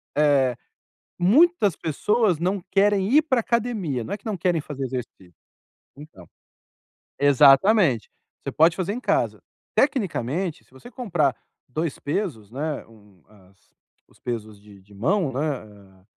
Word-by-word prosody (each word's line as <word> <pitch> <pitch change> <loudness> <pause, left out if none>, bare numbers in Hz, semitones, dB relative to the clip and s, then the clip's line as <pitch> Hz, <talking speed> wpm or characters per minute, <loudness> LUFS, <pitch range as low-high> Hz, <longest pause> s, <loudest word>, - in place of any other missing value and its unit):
Eh, 140 -4 +3 0.6
muitas 215 - +4
pessoas 185 +5 0
não 185 +3 -1
querem 200 -1 +2
ir 305 - +6
para 265 -6 +1
academia, 215 - -1
não - - -7
é - - -3
que - - -27
não 215 -4 -3
querem 175 -2 0
fazer 140 -2 -6
exercício. 120 -8 -7 0.6
Então. 140 - -14 0.9
Exatamente. 140 - +5 0.3
Você - - -6
pode 165 +2 +4
fazer 185 +1 -2
em 240 - -5
casa. - - 0 0.3
Tecnicamente, 180 - 0
se - - -32
você 130 - -14
comprar 170 - 0 0.3
2 155 +3 -3
pesos, 145 - -4
né, 150 +3 -4
um 105 -4 -21
as 95 -2 -23 0.5
os - - -27
pesos 110 -4 -6
de 100 -1 -17
de 100 +2 -20
mão 155 - 0
né, 130 - -3 0.6
eh - - -33
155 Hz, 140 wpm, -24 LUFS, 125-200 Hz, 0.9 s, ir